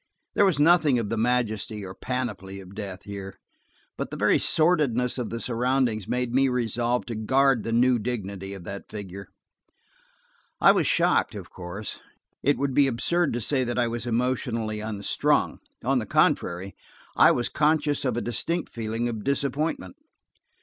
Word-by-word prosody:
There 205 - +4
was 185 -7 +2
nothing 155 -4 +5
of 115 -4 -2
the - - +1
majesty 110 -3 -1
or 95 - -7
panoply 105 -6 -4
of 95 0 -12
death 100 -3 -7
here, 100 -1 -8 0.6
but - - -3
the - - -6
very - - +3
sordidness 145 -7 +2
of 120 - -3
the 115 - -4
surroundings 125 -3 0
made 125 -1 -1
me 135 +1 +3
resolve 120 0 0
to 120 - -5
guard 130 +3 +2
the 115 - -4
new 120 +1 +3
dignity 100 -4 -4
of 95 - -10
that 100 +3 -8
figure. 100 -2 -8 1.3
I - - +7
was - - +1
shocked, - - +2
of - - -8
course; 95 +4 -7 0.4
it 145 +1 +2
would 140 -1 -1
be 140 +1 +4
absurd 155 +7 +1
to 120 - -2
say 130 +3 +1
that 120 0 -3
I 120 -1 +2
was 120 +1 -4
emotionally 115 -2 -1
unstrung. 105 -2 0 0.2
On - - +2
the - - -5
contrary, 90 +3 +1 0.4
I - - +7
was 120 - +1
conscious 150 -1 +1
of 125 -4 0
a - - 0
distinct 165 +9 -2
feeling 115 +1 -2
of 110 -3 -4
disappointment. 140 - -1
120 Hz, 165 wpm, -26 LUFS, 105-130 Hz, 1.3 s, I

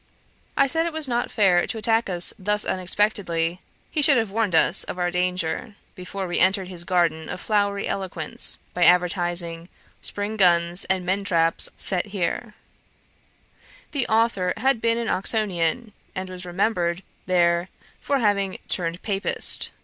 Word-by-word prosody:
I 275 - +5
said 325 +5 0
it 335 - -5
was 315 -2 -1
not 240 -1 -1
fair 185 -5 +3
to - - -3
attack 225 0 +1
us 175 -1 +3
thus 210 +2 -1
unexpectedly; 180 -3 0 0.3
he 305 - 0
should 280 -2 +6
have 225 -4 -1
warned 210 -5 0
us 170 +3 +4
of - - -6
our 175 -1 0
danger, 180 +4 -2 0.2
before 190 +1 -6
we 175 - -1
entered 190 0 +2
his 175 -2 -6
garden 170 -3 0
of 180 - -5
flowery 200 -1 0
eloquence, 190 -2 -1 0.2
by 175 - +1
advertising, 175 -1 +1 0.3
'Spring 205 +2 -2
guns 175 -2 +3
and 190 -1 -1
men 190 +2 0
traps 165 -4 +1
set 185 0 0
here.' 205 +3 -3 1.4
The 280 -4 -1
authour 220 -5 +1
had 255 0 +1
been 230 0 +2
an 235 -1 -2
Oxonian, 210 +1 0 0.2
and 190 0 -4
was 180 0 -7
remembered 175 -1 -1 0.2
there 175 0 +2 0.3
for 280 - 0
having 200 -5 0
'turned 170 0 -3
Papist.' 200 -2 +2
190 Hz, 150 wpm, -23 LUFS, 175-215 Hz, 1.4 s, should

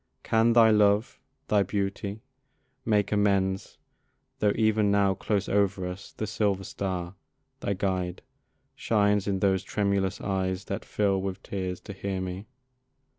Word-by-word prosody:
Can 115 +1 +3
thy 115 -2 +7
love, 105 +1 +3 0.3
Thy 105 -1 +3
beauty, 100 +2 -3 0.6
make 105 -3 +1
amends, 100 -2 +1 0.6
tho' 105 - +3
even 110 -2 +2
now, 100 -1 +3
Close 100 +1 -1
over 100 -2 +1
us, 90 +2 -7
the 110 - -4
silver 100 -2 0
star, 90 -3 -4 0.5
thy 100 - -1
guide, 90 -2 -2 0.5
Shines 105 -2 +1
in 95 -2 -1
those 95 -2 +3
tremulous 100 -2 0
eyes 95 -1 -2
that - - -4
fill 100 -2 +1
with 95 0 -4
tears 95 -2 -4
To 100 - -8
hear 95 -1 -3
me? 95 +3 -5
100 Hz, 135 wpm, -27 LUFS, 95-105 Hz, 0.6 s, thy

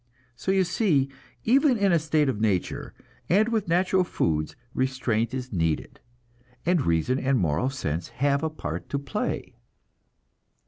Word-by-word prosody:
So 130 +10 -2
you 190 -1 +4
see, 170 - +2 0.3
even 265 +2 +4
in 200 -2 +3
a 170 - +4
state 155 -1 +1
of 105 -6 -1
nature, 100 -5 -1 0.3
and 210 +6 +4
with 220 -5 0
natural 185 +2 +3
foods, 80 - -1 0.2
restraint 130 -3 0
is 130 -2 -5
needed, 80 -4 -1 0.7
and 175 -3 +3
reason 85 +11 +1
and 135 0 +2
moral 85 - +1
sense 85 - -3
have 140 +1 0
a 160 - 0
part 155 - -6
to 140 - -1
play. 140 -1 -3
135 Hz, 145 wpm, -26 LUFS, 110-180 Hz, 0.7 s, you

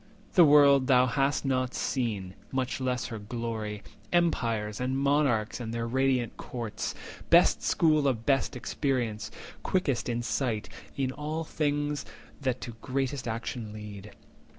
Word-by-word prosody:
The 175 - +8
world 140 -3 +6
thou 125 -2 +6
hast 135 +3 +1
not 130 -1 0
seen, 105 -8 -2 0.2
much 130 0 -2
less 125 -1 -1
her 110 - -4
glory, 110 -1 -4 0.3
Empires, 115 -11 +1
and 130 +1 0
monarchs, 140 -6 +2
and 115 -2 -4
their 115 0 -2
radiant 130 0 +1
courts— 115 -4 -4 0.3
Best - - +6
school 155 -3 +3
of 115 -4 -1
best 135 -3 +2
experience, 120 -4 -2 0.3
quickest 140 -11 0
in 120 0 -1
sight 115 -4 -1 0.3
In 135 -2 0
all 150 +3 -3
things 145 -2 -1 0.4
that 130 -3 -1
to 120 - -5
greatest 135 -1 -2
actions 115 -1 -4
lead. 105 -1 -8
130 Hz, 135 wpm, -29 LUFS, 115-140 Hz, 0.4 s, The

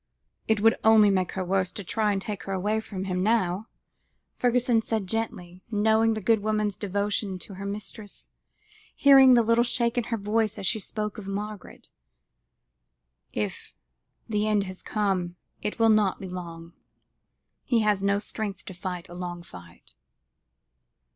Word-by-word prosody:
"It 220 -2 +2
would 225 +1 +5
only 220 -2 +6
make 185 -2 0
her 190 -1 -3
worse 185 0 0
to 205 - -5
try 210 +3 0
and 200 - 0
take 200 -1 -5
her 195 - -3
away 205 +4 0
from 195 -3 -6
him 185 -1 -2
now," 210 -1 +1 0.7
Fergusson 245 -1 +2
said 220 -2 -2
gently, 185 -4 -4
knowing 220 +1 +3
the 215 - -4
good 220 +3 +3
woman's 210 -1 0
devotion 200 0 -2
to 195 - -10
her 195 +1 -6
mistress, 205 0 -7 0.7
hearing 270 -2 +7
the 235 - +5
little 230 +1 +3
shake 240 0 +1
in 235 - -3
her 230 - -2
voice 215 +1 0
as 200 - -5
she 220 +4 +1
spoke 210 +1 -4
of 195 - -9
Margaret; 205 0 -7 1.4
"if 105 -2 -4 0.5
the 210 -1 0
end 210 -2 +2
has 185 -1 -8
come, 190 -4 -1 0.3
it 210 - -3
will 225 -1 +4
not 215 -3 +3
be 195 - -6
long; 170 -2 -8 0.9
he 235 -3 +2
has 210 -2 +2
no 200 0 +2
strength 205 -1 -4
to 190 - -8
fight 180 0 -5
a 175 - -11
long 175 -1 -6
fight." 85 - -15
205 Hz, 160 wpm, -26 LUFS, 185-220 Hz, 1.4 s, hearing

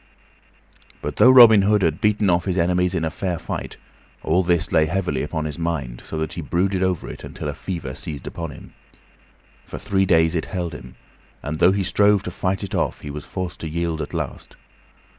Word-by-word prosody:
But - - -4
though 125 - +7
Robin 120 -5 +9
Hood 105 0 +2
had 80 -2 0
beaten 105 -1 +2
off 85 -1 +2
his 95 -2 -1
enemies 90 +1 +1
in 80 -2 0
fair 90 -1 -3
fight, - - -6 0.5
all 85 +4 +2
this 85 -2 +1
lay 80 0 +3
heavily 90 -6 -1
upon 80 +1 -3
his 75 +1 -5
mind, 70 -8 -3
so 80 - -6
that 80 -1 -3
he - - -5
brooded 95 +2 0
over 95 -3 0
it - - -9
until - - -7
a 75 - -2
fever 85 -4 -5
seized 70 -1 -5
upon 85 -1 -5
him. 70 - -12 0.9
For - - -7
three 95 -1 0
days 80 -2 +4
it 80 - -1
held 90 -3 -4
him, 65 0 -10 0.5
and 75 +2 -4
though 90 - +6
he 100 0 0
strove 100 +1 +3
to 90 - -5
fight 95 +2 -2
it 100 - -6
off, - - -1
he 75 - -7
was 75 0 -8
forced 90 -2 -5
to 80 - -5
yield 85 0 -2
at 75 - -5
last. - - -5
85 Hz, 205 wpm, -22 LUFS, 80-95 Hz, 0.9 s, Robin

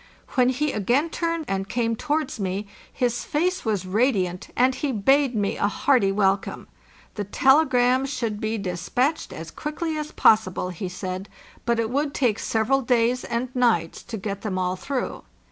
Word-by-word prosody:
When 250 -1 +3
he 285 +3 0
again 250 - +1
turned 335 -2 -2
and 195 0 -2
came 230 -1 0
towards 300 0 -2
me 195 +1 -2 0.3
his 245 -2 -1
face 360 +5 0
was 210 -5 -1
radiant, 190 -3 0
and 255 +2 +4
he 285 +1 -2
bade 265 +4 +3
me 205 -2 0
a 205 - +2
hearty 210 -2 +2
welcome. 195 -1 0 0.5
'The 205 - -4
tele 270 +9 +4
grams 250 +2 +2
should 220 -6 -3
be 220 +1 -1
despatched 210 - -1
as - - -8
quickly 310 +1 -3
as 300 0 -5
possible, 190 -4 +3
he 180 +1 -5
said; 185 +2 -5 0.4
but 235 -1 +2
it 225 0 -1
would 285 +2 -1
take 235 -5 +1
several 235 +5 +1
days 245 0 +2
and 245 +2 -3
nights 225 -10 +1
to 235 -2 -6
get 200 0 -4
them 195 -3 -3
all 185 0 0
through. 265 +7 -3
235 Hz, 170 wpm, -24 LUFS, 200-270 Hz, 0.5 s, and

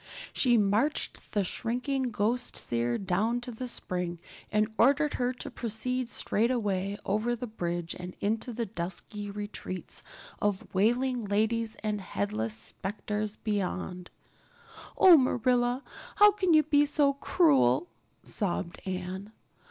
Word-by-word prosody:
She 245 -3 +4
marched 215 +8 0
the 205 - +2
shrinking 250 +7 -2
ghost 235 +3 -1
seer 120 0 0
down 200 +5 0
to 245 - -5
the 250 +2 -5
spring 180 -6 -2 0.3
and 215 +1 +1
ordered 285 +6 +4
her 245 0 0
to 250 - -7
proceed 240 +2 -2
straightaway 205 -5 0
over 215 +4 0
the 240 - -5
bridge 175 -6 -3
and 180 0 -8
into 220 +4 -1
the 235 0 -2
dusky 205 +2 -5
retreats 205 -2 -3 0.4
of 205 -2 0
wailing 240 +4 +2
ladies 220 +2 0
and 210 -1 -1
headless 105 - -2
specters 210 - -4
beyond. 185 -4 -3 0.9
"Oh, 360 -3 +9
Marilla, 250 0 +2 0.3
how 415 0 +8
can 375 -5 +2
you 310 - +6
be 290 -1 +3
so 285 -1 +3
cruel?" 140 - +3 0.4
sobbed 180 -3 -2
Anne. 185 +2 -4
215 Hz, 125 wpm, -29 LUFS, 185-245 Hz, 0.9 s, Oh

